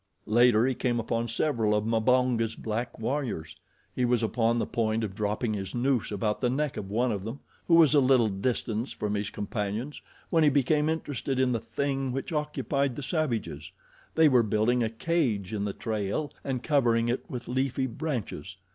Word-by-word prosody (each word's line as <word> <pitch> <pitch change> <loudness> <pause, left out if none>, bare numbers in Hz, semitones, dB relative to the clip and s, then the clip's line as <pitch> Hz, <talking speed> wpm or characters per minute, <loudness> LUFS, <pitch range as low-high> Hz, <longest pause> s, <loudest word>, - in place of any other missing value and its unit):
Later 120 0 +4
he 130 - +1
came 120 -1 0
upon 115 +1 -1
several 115 -3 +1
of 105 0 0
Mbonga's 115 0 +2
black 115 +2 -4
warriors. 115 - -3 0.4
He 125 - 0
was 120 -1 +2
upon 115 +1 +1
the - - 0
point 110 -1 0
of 105 -3 -3
dropping 105 +3 -1
his 95 -1 -5
noose 125 -2 +1
about 105 +1 -1
the 125 - +2
neck 145 +2 -1
of 95 - -5
one 120 +4 +1
of 100 -3 -3
them, 115 +6 -6 0.3
who 170 - +5
was 160 -3 +6
a 145 - +6
little 130 -3 +4
distance 110 +3 -2
from 105 -1 -3
his 105 0 -2
companions, 105 +7 -4 0.3
when 165 -2 +4
he 150 - +6
became 150 +2 +2
interested 145 -4 -2
in 130 -1 +3
the 115 - 0
thing 135 +4 -2
which 135 +5 -4
occupied 145 -3 -1
the 145 - -6
savages. 120 - -2 0.4
They 160 -1 +6
were 130 -4 +5
building 110 +3 +1
a 115 - +1
cage 115 - -1
in 105 -1 -1
the 100 - -1
trail 110 +5 -3
and 130 -3 -3
covering 120 -6 +2
it 120 +2 -2
with 125 - -6
leafy 130 +1 0
branches. 120 - -4
120 Hz, 185 wpm, -28 LUFS, 110-135 Hz, 0.4 s, was